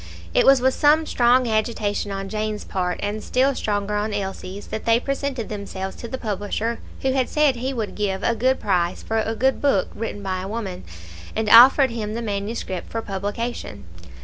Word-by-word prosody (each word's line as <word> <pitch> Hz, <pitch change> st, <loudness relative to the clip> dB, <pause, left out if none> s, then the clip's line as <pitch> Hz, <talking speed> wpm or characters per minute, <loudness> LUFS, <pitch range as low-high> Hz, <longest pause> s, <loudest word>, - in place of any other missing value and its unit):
It -, -, +3 dB
was 270 Hz, -2 st, +7 dB
with 260 Hz, +1 st, +3 dB
some 305 Hz, +2 st, +4 dB
strong 245 Hz, -2 st, +3 dB
agitation 215 Hz, -2 st, -1 dB
on 195 Hz, 0 st, -4 dB
Jane's 215 Hz, 0 st, -3 dB
part, 180 Hz, -2 st, -2 dB
and 210 Hz, +1 st, -3 dB
still 265 Hz, +2 st, +2 dB
stronger 205 Hz, -4 st, -2 dB
on 210 Hz, 0 st, -1 dB
Elsie's, 195 Hz, 0 st, -5 dB
that 220 Hz, -, -5 dB
they 230 Hz, 0 st, +4 dB
presented 275 Hz, -3 st, -3 dB
themselves 195 Hz, -2 st, -5 dB
to 235 Hz, -, -7 dB
the 260 Hz, -, -4 dB
publisher 215 Hz, +1 st, -3 dB, 0.2 s
who 265 Hz, -, +2 dB
had 260 Hz, -1 st, 0 dB
said 295 Hz, -4 st, +2 dB
he 260 Hz, +3 st, -2 dB
would 225 Hz, -5 st, -3 dB
give 195 Hz, -2 st, -2 dB
a 235 Hz, -, +2 dB
good 255 Hz, +4 st, +1 dB
price 180 Hz, -4 st, 0 dB
for 225 Hz, 0 st, -1 dB
a 220 Hz, +1 st, -1 dB
good 265 Hz, +4 st, +1 dB
book 270 Hz, -10 st, +2 dB
written 210 Hz, -2 st, -5 dB
by 185 Hz, -1 st, -2 dB
a 190 Hz, -, -5 dB
woman, 200 Hz, -, -5 dB, 0.5 s
and 220 Hz, -1 st, 0 dB
offered 260 Hz, +3 st, +8 dB
him 215 Hz, -2 st, -4 dB
the 235 Hz, -, -3 dB
manuscript 200 Hz, -3 st, -4 dB
for 225 Hz, 0 st, -3 dB
publication. 205 Hz, -, -4 dB
220 Hz, 190 wpm, -23 LUFS, 200-245 Hz, 0.5 s, offered